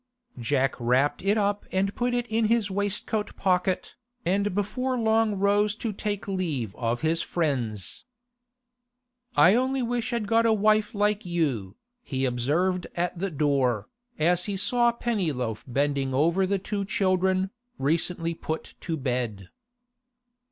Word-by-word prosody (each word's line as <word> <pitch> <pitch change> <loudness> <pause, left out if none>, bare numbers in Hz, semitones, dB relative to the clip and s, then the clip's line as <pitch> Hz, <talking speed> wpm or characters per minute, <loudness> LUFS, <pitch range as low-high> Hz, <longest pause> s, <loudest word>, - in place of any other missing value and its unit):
Jack 135 +3 +1
wrapped 125 +4 +2
it 200 +3 +2
up 205 0 +1
and 195 +1 0
put 245 0 0
it 245 -1 0
in 225 -1 +1
his 220 -2 +2
waistcoat 205 +2 -2
pocket, 185 -1 0 0.3
and 200 +1 +1
before 250 +6 -1
long 220 -2 +2
rose 205 +1 +2
to 220 -1 -3
take 205 0 -3
leave 160 - -2
of 120 0 -2
his 160 +1 +1
friends. 125 - -2 1.3
'I 180 - +7
only 260 +2 +1
wish 240 0 -1
I'd 235 -3 -1
got 230 +2 +3
a 225 - +4
wife 215 +1 +2
like 205 +1 +1
you,' 140 - -1 0.3
he 135 - -2
observed 155 +10 0
at 175 0 -2
the 195 +2 -1
door, 135 - +1 0.3
as 175 +3 +2
he 200 -2 -2
saw 240 +4 +3
Pennyloaf 155 - -2
bending 135 0 0
over 170 +7 +3
the 200 +1 +1
two 200 +1 -3
children, 190 -1 +1 0.3
recently 165 +4 0
put 160 -1 -5
to 165 -2 -2
bed. 120 - -3
185 Hz, 140 wpm, -26 LUFS, 140-210 Hz, 1.3 s, I